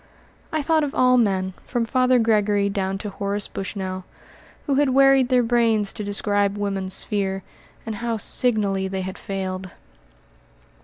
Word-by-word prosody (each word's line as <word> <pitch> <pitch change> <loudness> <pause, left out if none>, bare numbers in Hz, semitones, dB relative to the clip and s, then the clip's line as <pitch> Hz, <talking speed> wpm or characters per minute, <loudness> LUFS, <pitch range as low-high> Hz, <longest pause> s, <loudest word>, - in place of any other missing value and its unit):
I 310 -2 -1
thought 315 +1 +2
of 285 - -3
all 255 0 +4
men, 190 -4 0
from 240 -2 -2
Father 255 +2 +3
Gregory 210 -3 +2
down 195 -1 -2
to 205 - -4
Horace 200 +1 -2
Bushnell, 190 -1 -5 0.6
who 285 - 0
had 280 0 +3
wearied 270 -1 +5
their 250 -1 +4
brains 230 -3 +2
to 215 - -5
describe 205 0 0
woman's 195 -2 -1
sphere, 195 -2 -1 0.4
and 220 -2 -4
how 235 +1 -2
signally 205 -4 0
they 190 0 -3
had 185 0 -6
failed. 190 -1 -4
205 Hz, 150 wpm, -23 LUFS, 195-245 Hz, 0.6 s, wearied